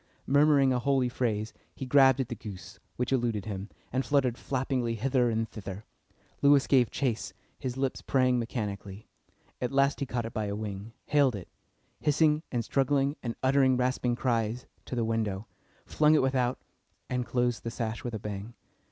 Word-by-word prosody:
Murmuring 140 -1 +4
a 125 - +1
holy 130 -1 +2
phrase, 110 -3 -2 0.2
he 135 - -5
grabbed 135 0 +5
at 130 - 0
the 120 - -4
goose, 95 -5 -9 0.2
which 125 +1 -2
eluded 120 -6 0
him, 100 -1 -5 0.2
and 130 +1 +1
fluttered 130 -5 +2
flappingly 125 -3 -1
hither 125 +1 +1
and 115 0 0
thither. 100 -1 -7 0.6
Lewis 140 -1 +5
gave 125 -4 +4
chase, 120 -5 -2 0.3
his 130 -2 -4
lips 135 -1 -1
praying 130 -2 +2
mechanically. 105 -3 -5 0.6
At 125 - -1
last 140 +1 +2
he 140 - -2
caught 120 -2 -2
it 115 - -6
by 110 - -1
a 100 0 -3
wing, 105 +1 -6
haled 140 -5 +3
it, 95 -4 -8 0.5
hissing 150 0 +3
and 120 -3 -1
struggling 140 +2 +1
and 115 -2 -4
uttering 130 -1 +4
rasping 125 -1 0
cries, 120 -1 -1 0.2
to - - -5
the 120 -2 0
window, 110 -3 -1 0.4
flung 155 0 +4
it 150 - +3
without, 130 -2 +1 0.5
and 125 -1 -1
closed 120 -1 0
the 115 - -3
sash 115 -1 -4
with 120 -2 -4
a - - -4
bang. 105 +3 -6
125 Hz, 175 wpm, -29 LUFS, 110-135 Hz, 0.6 s, grabbed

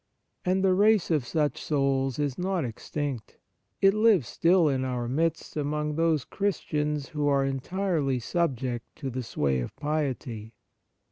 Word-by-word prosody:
And 185 +1 +1
the 190 -1 +4
race 205 -1 +4
of 145 -6 +1
such 150 -1 0
souls 135 -3 0
is 145 -3 -1
not 180 -4 -1
extinct. 125 +1 -5 0.4
It 195 0 +6
lives 215 - +4
still 170 -1 +3
in 135 -2 +1
our 125 -2 -2
midst 160 +5 -1
amongst 150 0 -1
those 165 -4 +2
Christians 150 -7 -2
who 150 -2 -1
are 140 -1 +3
entirely 145 0 -1
subject 125 -3 -2
to 135 - -5
the 130 +1 -3
sway 70 - 0
of - - -5
piety. 130 -7 -3
145 Hz, 145 wpm, -27 LUFS, 130-170 Hz, 0.4 s, It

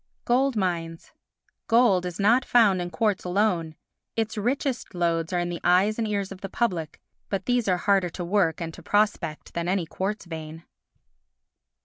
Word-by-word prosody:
Gold 260 +2 +2
Mines 170 -4 -2 0.6
Gold 225 -6 +4
is 175 +1 -7
not 230 +6 +4
found 210 -8 +4
in 175 - -3
quartz 205 +4 0
alone; 180 -4 0 0.4
its 220 -1 -1
richest 250 0 -2
lodes 170 -1 0
are 180 - 0
in 175 0 -1
the 175 - -5
eyes 190 +5 +3
and 225 - 0
ears 200 -2 -2
of 195 -1 -9
the 195 - -5
public, 180 -10 -2 0.3
but 195 -1 -2
these 245 -3 +1
are 180 -2 +3
harder 195 -1 +2
to 175 +1 -6
work 175 -3 +1
and 165 -2 -5
to 175 - -11
prospect 205 -5 0
than 170 0 -2
any 185 -1 0
quartz 195 +6 -4
vein. 160 -1 -8
190 Hz, 170 wpm, -25 LUFS, 170-215 Hz, 0.6 s, Gold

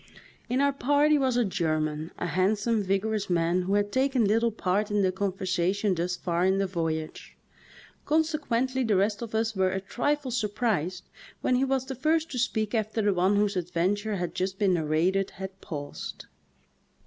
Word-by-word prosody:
In 255 +3 +1
our 280 0 +3
party 290 +2 +3
was 260 -3 +1
a 245 - +3
German, 155 -4 -1
a - - -3
handsome, 205 +6 +1
vigor 195 +3 0
ous 210 -3 -2
man, 175 +1 +2
who 190 +3 0
had 205 0 +1
taken 260 -2 +2
little 225 +3 +3
part 205 0 0
in 205 -1 +1
the 185 - +2
conver 190 0 -3
sation 185 +2 +1
thus 175 +1 -1
far 175 -1 -1
in 190 +1 +3
the 195 - +1
voyage. 165 -4 -4 0.7
Consequently 280 -5 +1
the 220 -4 +2
rest 200 +3 +1
of 225 -2 -5
us 220 0 0
were 190 -1 +2
a 190 +1 -2
trifle 265 +7 -1
surprised 210 -6 -1 0.3
when - - +1
he 255 - +2
was 265 -1 0
the 265 - -5
first 315 +5 0
to 250 - -3
speak 220 -3 0
after 220 -1 0
the 205 -1 +3
one 185 +3 +2
whose 205 -1 +1
adventure 185 +4 -1
had 175 -3 -3
just 190 +1 -2
been 195 -3 +2
narrated 170 +4 +1
had 190 0 -7
paused. 145 -3 -7
205 Hz, 185 wpm, -27 LUFS, 185-235 Hz, 0.7 s, our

